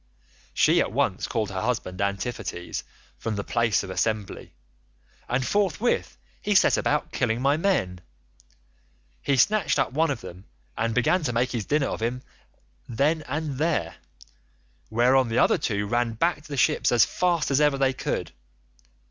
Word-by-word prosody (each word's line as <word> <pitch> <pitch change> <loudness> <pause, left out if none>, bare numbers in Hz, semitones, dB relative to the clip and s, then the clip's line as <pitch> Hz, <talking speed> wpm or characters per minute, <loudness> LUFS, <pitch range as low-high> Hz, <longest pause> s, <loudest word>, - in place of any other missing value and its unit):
"She - - +4
at - - -1
once - - 0
called 110 -3 -2
her 95 -1 -3
husband 110 -6 -2
Antiphates 100 -2 -3 0.4
from 110 -2 -3
the 100 - -3
place 115 -2 +1
of 95 - -7
assembly, 100 +2 -2 0.8
and 125 +1 0
forthwith 205 - 0 0.2
he 210 - 0
set - - +5
about 150 +1 0
killing 120 -2 0
my 140 +3 +2
men. 155 - 0 1.2
He 140 -1 +1
snatched 205 +7 +3
up 135 - 0
one 160 +3 +2
of 135 -5 -3
them, 90 +3 -11 0.3
and 115 0 -1
began 125 +9 +2
to 130 -6 -2
make 120 +2 0
his 115 -5 -3
dinner 145 -1 +1
off - - -5
him 125 +2 -2 0.7
then 145 +7 +1
and 145 -1 -3
there, 150 - -1 0.9
whereon 125 +2 +3
the 115 - -1
other - - +4
two 105 -2 -1
ran 120 +2 0
back 165 +7 0
to - - -15
the 145 -2 -5
ships - - +2
as 120 -2 +5
fast 175 -5 0
as 135 +2 +3
ever 150 -2 +3
they 135 -1 +2
could. - - -3
125 Hz, 165 wpm, -25 LUFS, 110-150 Hz, 1.2 s, set